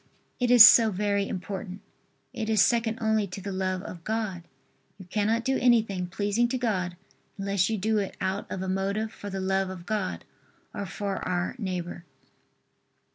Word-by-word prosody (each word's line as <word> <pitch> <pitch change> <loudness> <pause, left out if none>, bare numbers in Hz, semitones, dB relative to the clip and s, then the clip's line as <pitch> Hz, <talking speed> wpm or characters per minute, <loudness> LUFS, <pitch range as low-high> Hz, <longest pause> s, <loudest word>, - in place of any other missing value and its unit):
It 245 -1 +1
is 245 -1 +11
so 225 -2 +7
very 200 0 0
important. 190 +1 -6 0.5
It 225 -2 -4
is 220 -1 +2
second 230 -2 +1
only 220 -2 +1
to 180 +2 -7
the 200 +1 -5
love 185 0 -2
of 170 -4 -9
God. 215 -4 -2 0.6
You 190 - -11
cannot 215 +5 0
do 265 0 +1
anything 220 -7 +2
pleasing 205 +5 0
to 255 +2 -2
God 185 -8 -2 0.4
unless 195 -1 0
you 220 - -1
do 215 +2 +1
it 195 - -4
out 190 +2 -3
of 190 - -4
a - - -4
motive 200 +4 -2
for 205 - -8
the 195 0 -4
love 190 0 0
of 180 -2 -8
God 210 -2 -3 0.5
or 205 -2 -4
for 200 +2 -3
our 180 0 -2
neighbor. 180 -4 -4
200 Hz, 175 wpm, -27 LUFS, 185-220 Hz, 0.6 s, is